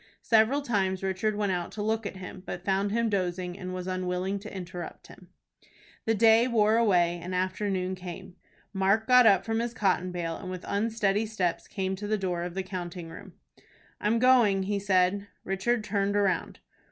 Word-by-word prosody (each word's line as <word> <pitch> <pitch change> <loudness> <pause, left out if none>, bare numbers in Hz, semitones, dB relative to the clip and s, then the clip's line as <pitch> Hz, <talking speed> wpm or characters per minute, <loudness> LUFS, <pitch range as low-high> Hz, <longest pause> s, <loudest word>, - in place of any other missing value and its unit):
Several 230 +6 +3
times 195 -6 0
Richard 195 +3 0
went 205 -2 0
out 175 -2 -2
to 205 - -4
look 220 0 -1
at - - -7
him, 185 0 -8
but 175 +1 -6
found 195 +1 +1
him 230 +1 +1
dozing, 180 -3 -2
and 185 -1 -6
was 185 -1 -5
unwilling 185 +1 -2
to 210 +2 -9
interrupt 180 -2 -7
him. - - -15 0.8
The 225 - +2
day 225 +2 +5
wore 220 -3 +3
away, 175 -6 +3
and 180 +2 -4
afternoon 185 0 -1
came. 185 0 -8 0.4
Mark 195 +3 +2
got 250 -2 +7
up 195 -2 +4
from 225 0 0
his 235 +1 -3
cotton 185 -3 +1
bale, 170 -2 -3
and 185 - -8
with 185 -1 -6
unsteady 210 0 0
steps 185 -6 -2
came 190 -2 -2
to 205 +1 -5
the 215 +1 +1
door 180 -3 -2
of 175 0 -5
the 190 - -2
counting 175 -2 -6
room. 180 +3 -11 0.7
"I'm 215 +3 +1
going," 230 -6 +4
he 200 +1 -1
said. 195 0 +2 0.2
Richard 210 +5 0
turned 200 -1 0
round. 200 -2 0
195 Hz, 185 wpm, -28 LUFS, 185-215 Hz, 0.8 s, got